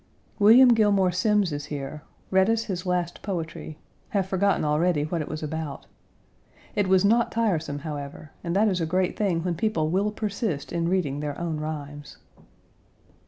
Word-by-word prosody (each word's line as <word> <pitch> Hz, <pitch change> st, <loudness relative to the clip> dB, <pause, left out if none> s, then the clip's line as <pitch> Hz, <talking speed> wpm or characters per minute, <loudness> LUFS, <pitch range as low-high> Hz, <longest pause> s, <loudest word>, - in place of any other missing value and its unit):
William 235 Hz, +5 st, +8 dB
Gilmore 205 Hz, -5 st, +4 dB
Simms 200 Hz, 0 st, +2 dB
is 145 Hz, 0 st, -4 dB
here; 145 Hz, +1 st, -6 dB, 0.3 s
read 190 Hz, +2 st, +4 dB
us 225 Hz, 0 st, +2 dB
his 185 Hz, -3 st, -4 dB
last 175 Hz, -1 st, -1 dB
poetry; 165 Hz, -5 st, -5 dB, 0.3 s
have 200 Hz, -5 st, 0 dB
forgotten 190 Hz, -2 st, +1 dB
already 150 Hz, +1 st, +2 dB
what 160 Hz, +2 st, -2 dB
it 150 Hz, -, -5 dB
was 155 Hz, 0 st, -5 dB
about. 155 Hz, -2 st, -5 dB, 0.9 s
It 205 Hz, -2 st, +1 dB
was 190 Hz, +1 st, +4 dB
not 230 Hz, +3 st, +3 dB
tiresome, 175 Hz, -10 st, 0 dB
however, 145 Hz, 0 st, -6 dB
and 170 Hz, 0 st, -2 dB
that 210 Hz, +3 st, +4 dB
is 185 Hz, -4 st, 0 dB
a 165 Hz, -, 0 dB
great 185 Hz, +2 st, 0 dB
thing 180 Hz, -6 st, 0 dB
when 180 Hz, -1 st, -1 dB
people 165 Hz, -4 st, 0 dB
will 195 Hz, +4 st, +1 dB
persist 210 Hz, -7 st, -3 dB
in 170 Hz, 0 st, 0 dB
reading 160 Hz, -7 st, 0 dB
their 145 Hz, -1 st, -4 dB
own 170 Hz, -2 st, -2 dB
rhymes. 145 Hz, -1 st, -6 dB
175 Hz, 165 wpm, -25 LUFS, 155-200 Hz, 0.9 s, William